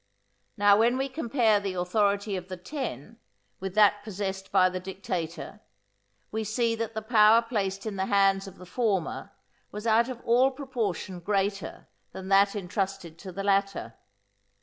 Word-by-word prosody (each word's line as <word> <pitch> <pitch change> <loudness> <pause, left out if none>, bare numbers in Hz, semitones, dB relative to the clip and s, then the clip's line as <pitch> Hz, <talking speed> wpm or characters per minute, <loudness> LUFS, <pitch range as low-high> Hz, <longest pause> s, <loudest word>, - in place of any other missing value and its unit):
Now 205 0 +5
when 235 +3 +3
we 270 +1 -1
compare 240 -6 +1
the 195 -2 -4
authority 200 +3 0
of 180 -1 -6
the 185 -1 -6
Ten 225 - -6 0.4
with 190 0 -5
that 205 -1 +5
possessed 195 -2 -5
by 185 -2 +5
the 185 0 -3
dictator, 185 -3 -5 0.7
we 220 +1 -2
see 230 +2 0
that 225 -1 -4
the 220 - -3
power 220 0 +6
placed 200 -4 -2
in 210 -3 -4
the 190 0 -1
hands 195 -1 +3
of 195 - -11
the 180 - -12
former 195 -3 -2 0.4
was 210 +2 -7
out 230 +2 +3
of 250 -2 -6
all 245 +3 +4
proportion 235 - -4
greater 200 +2 -2 0.3
than 190 0 -7
that 200 +1 +4
entrusted 190 -3 -4
to 190 - -8
the 195 +2 -5
latter. 195 - 0
200 Hz, 160 wpm, -27 LUFS, 190-225 Hz, 0.7 s, power